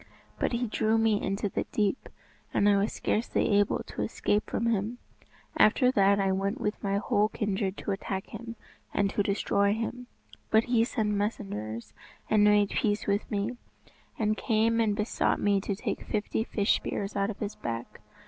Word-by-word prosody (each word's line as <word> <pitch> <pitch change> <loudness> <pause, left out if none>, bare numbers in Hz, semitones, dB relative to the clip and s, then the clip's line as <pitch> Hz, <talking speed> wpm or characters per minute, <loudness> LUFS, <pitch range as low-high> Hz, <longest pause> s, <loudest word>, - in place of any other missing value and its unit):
But - - +1
he 240 +1 0
drew 220 0 +1
me 225 -2 +2
into 195 +2 -1
the - - -2
deep, 210 +3 -1 0.5
and 205 - +4
I 205 - +5
was 200 +2 +1
scarcely 210 -2 +1
able 205 - +1
to - - -6
escape 210 +1 0
from 230 - -1
him. 225 +1 0 0.6
After 250 +4 +5
that 200 -3 +4
I 195 -1 +2
went 195 +1 -1
with 210 +1 -2
my 200 0 +1
whole 210 +1 +2
kindred 200 -2 -2
to - - -3
attack 195 -1 -3
him, 230 0 -8 0.4
and 200 -1 +2
to - - -14
try - - +4
to 200 - 0
destroy 200 0 +2
him, 245 +2 -4 0.4
but 220 +1 +4
he 235 -2 +2
sent 215 -3 -1
messengers 155 - -3 0.4
and 215 -1 +5
made 210 -1 +4
peace 210 -4 0
with 200 +1 0
me, 210 +4 -2 0.6
and 215 -1 +1
came 225 +1 +2
and 210 -2 +2
besought 210 +1 0
me 200 -1 +2
to 200 0 -2
take 195 - -3
fifty 215 +1 -1
fish 205 -3 +1
spears 200 0 -4
out 200 0 +1
of 210 - -5
his 210 -1 -4
back. 115 0 -6
205 Hz, 185 wpm, -28 LUFS, 200-220 Hz, 0.6 s, I